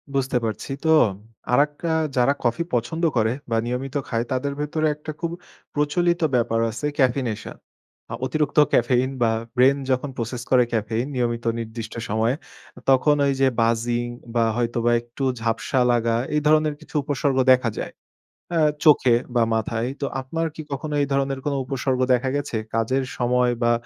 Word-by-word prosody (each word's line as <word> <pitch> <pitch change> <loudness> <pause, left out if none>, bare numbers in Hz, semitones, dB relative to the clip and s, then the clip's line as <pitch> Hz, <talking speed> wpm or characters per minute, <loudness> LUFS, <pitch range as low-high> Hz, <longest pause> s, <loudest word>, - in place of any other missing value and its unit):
বুঝতে 135 -2 +1
পারছি। 110 +4 -4
তো 160 - +1 0.6
আরেকটা 145 +5 +1 0.2
আ - - -4
যারা 125 +3 +4
coffee 125 +8 0
পছন্দ 125 +8 -1
করে 110 0 +2 0.2
বা 115 - 0
নিয়মিত 125 +3 -4
খায় 115 0 -1
তাদের 130 +2 -1
ভেতরে 155 +1 0
একটা 150 +1 -7
খুব 170 -2 -2 0.4
প্রচলিত 170 +4 +1
ব্যাপার 115 -1 +1
আছে 110 +7 -5
caffeination. 125 -5 0 0.6
আ - - -3
অতিরিক্ত 150 +3 -1 0.2
caffein 125 +2 +3
বা 115 - +4 0.3
brain 130 +2 +5 0.2
যখন 130 +2 0
process 120 +1 -4
করে 125 -1 +6
caffein 110 +2 -1
নিয়মিত 120 -1 -1
নির্দিষ্ট 115 0 -6 0.2
সময়ে 110 +4 +1 0.4
অ - - -9
তখন 135 +3 +5
ওই 140 - +2
যে 135 - +5
buzzing 120 +1 +1 0.3
বা 115 - +4
হয়তোবা 120 0 +1
একটু 120 +3 -8 0.2
ঝাপসা 115 +3 0
লাগা 115 -1 +1 0.2
এই 150 - +2
ধরনের 155 -1 +4
কিছু - - -16
উপসর্গ 140 -1 0
দেখা 125 -2 +4
যায়। - - -5 0.6
অ্যা 165 -2 +2 0.2
চোখে 130 -5 +6 0.2
বা 120 - +4
মাথায়। 115 +2 -1
তো - - 0 0.2
আপনার 165 +5 -2
কি 155 - -6
কখনো 150 +2 -4
এই 140 - +1
ধরনের 135 0 0
কোন 145 - 0
উপসর্গ 130 -1 -1
দেখা 125 +1 +1
গেছে 145 -4 -3 0.2
কাজের 120 +4 +1
সময় 125 0 +2
বা 120 - +4
125 Hz, 165 wpm, -23 LUFS, 120-145 Hz, 0.6 s, করে